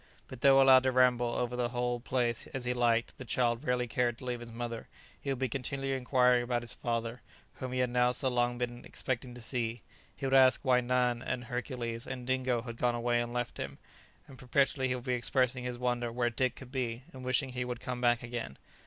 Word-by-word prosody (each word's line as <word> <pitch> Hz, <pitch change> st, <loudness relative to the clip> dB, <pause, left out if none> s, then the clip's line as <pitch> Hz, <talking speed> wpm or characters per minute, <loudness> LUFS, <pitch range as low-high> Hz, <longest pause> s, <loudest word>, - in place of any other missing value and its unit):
But 130 Hz, -1 st, -10 dB
though 135 Hz, -1 st, +7 dB
allowed 135 Hz, -1 st, +8 dB
to 130 Hz, 0 st, +1 dB
ramble 125 Hz, -2 st, +3 dB
over 125 Hz, 0 st, -1 dB
the 120 Hz, -1 st, 0 dB
whole 120 Hz, 0 st, -1 dB
place 120 Hz, 0 st, -1 dB
as 130 Hz, -2 st, -3 dB
he 125 Hz, -, +1 dB
liked, 120 Hz, -1 st, +1 dB
the -, -, -5 dB
child 120 Hz, 0 st, 0 dB
rarely 125 Hz, -3 st, +1 dB
cared 120 Hz, 0 st, 0 dB
to 125 Hz, -, -10 dB
leave 125 Hz, -1 st, -2 dB
his 120 Hz, 0 st, -9 dB
mother; 115 Hz, 0 st, -5 dB, 0.3 s
he 140 Hz, -, -4 dB
would 135 Hz, -, 0 dB
be 130 Hz, +1 st, 0 dB
continually 135 Hz, +2 st, -2 dB
inquiring 125 Hz, -1 st, +3 dB
about 120 Hz, 0 st, -1 dB
his 115 Hz, -, -5 dB
father, 115 Hz, 0 st, -3 dB, 0.4 s
whom 130 Hz, -1 st, -5 dB
he 125 Hz, 0 st, 0 dB
had 125 Hz, -1 st, 0 dB
now 125 Hz, 0 st, +3 dB
so 130 Hz, +2 st, -1 dB
long 120 Hz, -1 st, +1 dB
been 120 Hz, 0 st, -4 dB
expecting 125 Hz, -1 st, -4 dB
to 120 Hz, -, -10 dB
see: 120 Hz, -1 st, -2 dB, 0.3 s
he 140 Hz, -, -5 dB
would 135 Hz, -, 0 dB
ask 130 Hz, -1 st, +6 dB
why 125 Hz, -1 st, +4 dB
Nan 125 Hz, -1 st, +1 dB
and 125 Hz, -1 st, -3 dB
Hercules 120 Hz, -2 st, -4 dB
and 130 Hz, -2 st, -5 dB
Dingo 130 Hz, -2 st, 0 dB
had 115 Hz, -2 st, -7 dB
gone 120 Hz, 0 st, +1 dB
away 120 Hz, 0 st, +1 dB
and 120 Hz, 0 st, -4 dB
left 120 Hz, 0 st, -3 dB
him; -, -, -5 dB, 0.5 s
and 130 Hz, -, -13 dB
perpetually 135 Hz, +1 st, +1 dB
he 125 Hz, -, 0 dB
would 125 Hz, -, -6 dB
be 125 Hz, -1 st, -1 dB
expressing 125 Hz, +1 st, +1 dB
his 125 Hz, -1 st, -3 dB
wonder 120 Hz, -1 st, -1 dB
where 120 Hz, 0 st, 0 dB
Dick 130 Hz, +1 st, 0 dB
could 130 Hz, -2 st, -11 dB
be, 125 Hz, -2 st, -2 dB
and 130 Hz, -1 st, -9 dB
wishing 130 Hz, +1 st, +1 dB
he 125 Hz, -1 st, -3 dB
would 125 Hz, -1 st, -4 dB
come 125 Hz, -1 st, -4 dB
back 120 Hz, -1 st, +3 dB
again. 120 Hz, -, -5 dB
125 Hz, 230 wpm, -31 LUFS, 120-130 Hz, 0.5 s, allowed